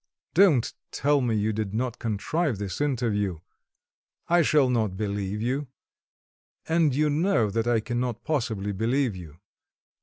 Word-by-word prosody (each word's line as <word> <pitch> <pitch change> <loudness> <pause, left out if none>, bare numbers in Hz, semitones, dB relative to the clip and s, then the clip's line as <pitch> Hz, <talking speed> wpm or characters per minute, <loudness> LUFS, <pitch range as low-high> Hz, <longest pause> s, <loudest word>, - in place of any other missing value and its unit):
Don't 165 - +4 0.2
tell 145 0 +1
me 120 -3 0
you 110 +1 0
did 105 -1 -3
not 120 0 -2
contrive 120 - -1
this 100 +3 -4
interview; 110 - 0 0.9
I 175 +1 +4
shall 150 -3 +4
not 110 -6 0
believe 100 0 -2
you 135 +4 -1 1.0
and 160 -4 +2
you 150 +2 +2
know 150 - +2
that 115 +3 -1
I 120 -2 +2
cannot 120 0 -3
possibly 115 -9 -1
believe 115 +3 0
you. 80 -4 -10
120 Hz, 140 wpm, -26 LUFS, 105-145 Hz, 1.0 s, Don't